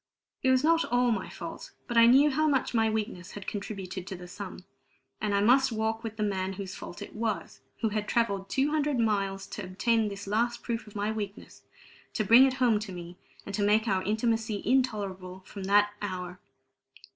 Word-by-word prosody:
It 260 - +2
was 260 +1 +4
not 330 +1 +4
all 245 0 +2
my 225 - -2
fault, - - -8
but 240 - -4
I 230 0 +8
knew 275 +5 +6
how 310 +3 +2
much 275 -4 +1
my 225 -1 +3
weakness 210 -4 -3
had 205 -2 -8
contributed 195 -3 -5
to 190 - -5
the 180 0 -10
sum. 185 0 -8 0.6
And 205 -1 0
I 200 - +3
must 260 +4 +4
walk 220 +1 -1
with 225 -1 -6
the 215 - 0
man 190 -2 -1
whose 190 -1 -6
fault 195 +2 -8
it - - -11
was, 220 -2 -3 0.2
who 225 - +2
had 210 0 -2
travelled 200 -5 0
two 275 +2 +1
hundred 295 -4 +1
miles 195 -3 0
to 210 - -6
obtain 215 +5 +1
this 200 0 -6
last 235 +4 0
proof 230 -2 -3
of 210 - -14
my 205 +1 -1
weakness, 205 -2 -6 0.5
to 215 - +1
bring 240 +6 +8
it 260 - 0
home 245 -5 +3
to 210 -2 -6
me, 175 0 -9 0.3
and 200 - -7
to 205 - -1
make 210 +2 +3
our 190 -3 +2
intimacy 220 0 0
intolerable 200 -7 -1
from 195 -2 -7
that 205 +1 +4
hour. 180 -3 -5
215 Hz, 205 wpm, -29 LUFS, 195-235 Hz, 0.6 s, I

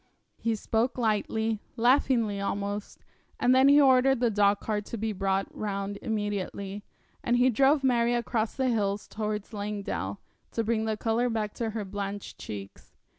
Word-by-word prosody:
He 230 -1 0
spoke 225 +4 -1
lightly, 220 -1 0 0.2
laughingly 235 -4 +2
almost, 200 +1 -4 0.4
and 250 - +4
then 260 +1 +6
he 285 +1 +7
ordered 265 -1 +5
the 240 -2 +2
dogcart 205 +1 +1
to 230 - -5
be 220 0 -2
brought 195 0 0
round 200 -1 -3
immediately, 205 -2 -3 0.4
and 240 0 +2
he 255 +1 +4
drove 275 +4 +3
Mary 240 -2 +3
across 235 -2 -1
the 260 -1 +1
hills 205 -3 0
towards 210 0 -4
Langdale, 200 - -4 0.3
to 230 - 0
bring 220 0 0
the 220 -1 -1
colour 230 +3 +1
back 215 -2 -2
to 230 -2 -2
her 210 - -3
blanched 200 +1 -5
cheeks. 100 -2 -9
220 Hz, 155 wpm, -28 LUFS, 205-240 Hz, 0.4 s, he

